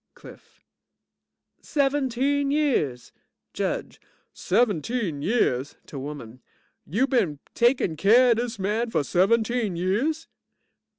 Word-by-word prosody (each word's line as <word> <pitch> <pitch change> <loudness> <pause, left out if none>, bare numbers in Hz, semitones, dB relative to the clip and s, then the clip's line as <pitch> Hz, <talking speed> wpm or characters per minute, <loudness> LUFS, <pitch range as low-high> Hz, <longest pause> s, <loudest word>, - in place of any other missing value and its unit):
CLIFF - - -16 1.0
Seventeen 280 -1 0
years 265 - 0 0.4
JUDGE - - -3 0.3
Seventeen 205 - 0
years? 145 - 0
(to 140 - -8
woman) 130 -4 -8 0.5
You 215 - +1
been 220 - 0 0.2
takin' 235 -8 +2
keer 235 +9 +5
of 230 - +3
dis 240 -1 -3
man 210 +5 -1
for 155 - 0
seventeen 220 - +1
years? 240 - -1
230 Hz, 100 wpm, -25 LUFS, 170-255 Hz, 1.0 s, keer